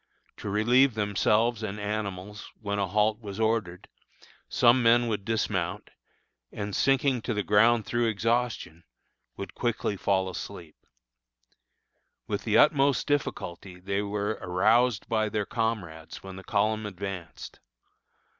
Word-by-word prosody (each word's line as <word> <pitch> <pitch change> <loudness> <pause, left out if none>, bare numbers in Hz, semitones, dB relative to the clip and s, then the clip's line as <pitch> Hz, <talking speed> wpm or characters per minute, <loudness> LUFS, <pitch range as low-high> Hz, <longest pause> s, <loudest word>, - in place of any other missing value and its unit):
To - - -6
relieve 120 +5 +3
themselves 105 +2 +1
and 105 -1 -4
animals, 105 -1 -5
when 100 -1 -3
a 100 - 0
halt 105 +3 +1
was 100 -1 -7
ordered, 110 -5 -1 0.6
some 120 +1 +4
men 120 +1 +5
would 105 -3 -2
dismount, 100 -3 -2 0.6
and, 105 -1 -5
sinking 135 -2 +2
to 115 0 -3
the 105 - 0
ground 110 +3 +4
through 120 -1 0
exhaustion, 115 -6 -1 0.5
would 100 -2 -7
quickly 120 -3 -1
fall 95 -1 +1
asleep. 90 -3 -8 1.4
With - - -4
the - - +3
utmost 140 -2 +4
difficulty 95 - -3
they 100 +2 -2
were 105 +1 -2
aroused 105 +5 +2
by 110 -2 0
their 105 0 -1
comrades 95 -10 -4
when 95 -1 -8
the 95 - -10
column 110 +1 0
advanced. 95 -3 -7
105 Hz, 125 wpm, -27 LUFS, 100-115 Hz, 1.4 s, men